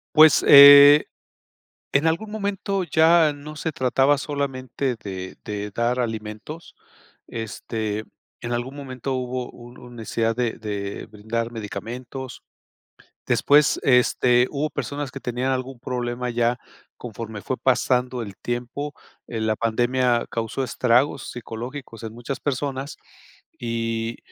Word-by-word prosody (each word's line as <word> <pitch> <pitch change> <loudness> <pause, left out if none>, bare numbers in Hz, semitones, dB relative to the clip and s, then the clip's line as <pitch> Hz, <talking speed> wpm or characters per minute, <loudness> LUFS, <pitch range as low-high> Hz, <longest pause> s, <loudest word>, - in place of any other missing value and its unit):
Pues, 155 -1 +7
eh, 145 +1 +10 0.8
en 140 +3 +2
algún 165 +7 0
momento 200 -2 -2
ya 160 -2 +4
no 150 +2 -10
se 160 +1 -3
trataba 135 +2 +2
solamente 135 -3 -3
de 95 -2 -6
de 105 -1 -5
dar 120 +3 0
alimentos, 110 +7 -5 0.5
este, 110 -1 -4 0.4
en 120 - -5
algún 120 +3 -3
momento 135 -2 -5
hubo 125 0 -3
un 120 0 -13
necesidad 115 0 -1
de 120 -3 -2
de 100 -2 -5
brindar 115 +2 -4
medicamentos, 115 +4 -7 0.8
después, 145 0 +3
este, 125 -1 +4
hubo 150 +2 -1
personas 145 -2 -4
que 135 - -7
tenían 125 +1 -2
algún 130 -1 -3
problema 125 -1 -3
ya 120 +1 0 0.4
conforme 110 -3 -7
fue 130 - -3
pasando 125 -1 +1
el 100 -3 -8
tiempo, 125 +5 -4 0.3
en 110 -2 -3
la 110 - +1
pandemia 120 +1 +1
causó 115 +3 -3
estragos 125 +2 +1
psicológicos 120 0 -8
en 110 0 -7
muchas 120 +3 -5
personas 140 0 -3 0.6
y 115 -1 -3
125 Hz, 120 wpm, -23 LUFS, 115-140 Hz, 0.8 s, eh